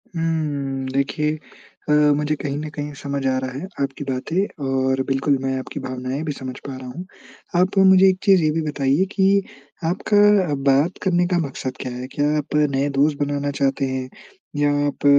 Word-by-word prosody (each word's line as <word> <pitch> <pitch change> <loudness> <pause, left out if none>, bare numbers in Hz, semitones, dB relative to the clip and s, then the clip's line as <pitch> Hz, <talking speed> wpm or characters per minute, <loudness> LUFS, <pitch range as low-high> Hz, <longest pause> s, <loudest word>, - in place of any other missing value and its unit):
हुँ। 145 -5 -1
देखिए 150 +3 0 0.5
अ, - - +3 0.2
मुझे 150 +1 0
कहीं 145 -1 -4
न 155 +1 -4
कहीं 145 0 -4
समझ 140 -1 -4
आ 130 0 +1
रहा 130 0 -4
है 185 - -6
आपकी 140 +1 -2
बातें 150 +6 -2
और 130 0 +1
बिल्कुल 135 +1 +1
मैं 135 0 -1
आपकी 130 - -6
भावनाएँ 130 +2 -4
भी 155 - -2
समझ 130 -2 -6
पा 135 - -5
रहा 130 -1 -9
हूँ। 170 +9 -7 0.6
आप 185 +2 0
मुझे 190 0 +7
एक 185 - +1
चीज़ 195 -3 +5
ये 155 - +3
भी - - +1
बताइए 145 +4 +1
कि 190 -2 +2 0.6
आपका 205 -2 +3 0.2
बात 145 +7 +2
करने 180 -2 +2
का 180 -1 +1
मकसद 130 -1 -6
क्या 130 - -4
है? 125 +1 -6
क्या 145 +2 -1
आप 150 0 -3 0.2
नए 140 +2 +1
दोस्त 145 0 +3
बनाना 145 0 -1
चाहते 135 0 +1
हैं 130 -1 -3 0.5
या 145 0 +3 0.2
आप 145 - -5
145 Hz, 185 wpm, -22 LUFS, 135-165 Hz, 0.6 s, मुझे